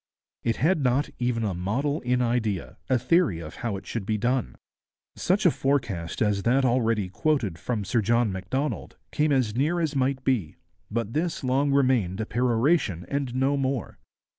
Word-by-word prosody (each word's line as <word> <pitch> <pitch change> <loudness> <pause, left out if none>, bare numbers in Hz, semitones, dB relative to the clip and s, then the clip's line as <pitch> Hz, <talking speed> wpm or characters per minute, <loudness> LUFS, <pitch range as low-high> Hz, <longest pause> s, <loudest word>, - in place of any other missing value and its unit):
It 115 - +1
had 160 +2 +2
not 135 +4 +1
even 120 -2 0
a 100 -3 0
model 125 - -1
in 125 0 +1
idea, 110 -6 -1
a 130 - +4
theory 125 - +2
of 75 -2 -9
how 110 -5 -2
it 95 - -11
should 115 - -4
be 110 +2 -1
done. 125 +3 0 0.6
Such 190 +3 +1
a 175 - +7
forecast 115 - -1
as 105 -2 +1
that 130 +5 +2
already 115 -5 +1
quoted 100 - -1
from 110 -5 -2
Sir 120 +1 +1
John 115 +1 +2
Macdonald 100 - -3
came 150 0 +1
as 125 -6 +1
near 155 +7 +1
as 155 -3 -1
might 130 0 0
be, 110 - 0 0.3
but 115 0 -2
this 160 -1 -1
long 135 +2 +2
remained 125 -9 +2
a 110 - -1
peroration 120 - +1
and 140 -3 -2
no 135 +2 +2
more. 135 -4 -2
125 Hz, 175 wpm, -26 LUFS, 105-140 Hz, 0.6 s, a